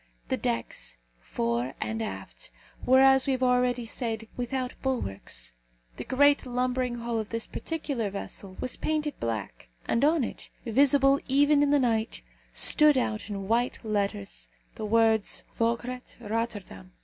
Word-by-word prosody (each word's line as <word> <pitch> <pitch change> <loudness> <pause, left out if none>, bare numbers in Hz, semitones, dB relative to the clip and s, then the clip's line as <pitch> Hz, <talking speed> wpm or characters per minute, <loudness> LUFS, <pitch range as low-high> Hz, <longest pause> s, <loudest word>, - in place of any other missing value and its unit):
The - - +1
decks, 115 - -3 0.2
fore 115 - -2
and 110 +1 -3
aft, 95 - -6 0.3
were, 260 +1 +5
as 265 0 +6
we 270 - +2
have 260 0 -1
already 250 -1 +2
said, 225 -1 -4
without 255 +1 -3
bulwarks. 95 - -3 0.4
The - - -4
great 285 +2 +4
lumbering 250 0 -1
hull 235 -1 -2
of 215 - -5
this 230 0 -3
particular 280 -9 -3
vessel 195 -1 -7
was 255 - -3
painted 305 -1 -1
black, 105 - -4 0.2
and 230 - +1
on 305 -1 +4
it, - - -6 0.2
visible 275 +3 +4
even 285 +2 +4
in 290 - +3
the 290 - +4
night, 230 -4 0 0.3
stood 300 -2 +6
out, 215 -4 -1
in 195 -2 -5
white 235 +3 +1
letters, 100 - -2 0.2
the - - -5
words, 225 -1 +2 0.2
Vograat, 240 +2 -2
Rotterdam. 215 -4 -4
235 Hz, 145 wpm, -27 LUFS, 195-260 Hz, 0.4 s, as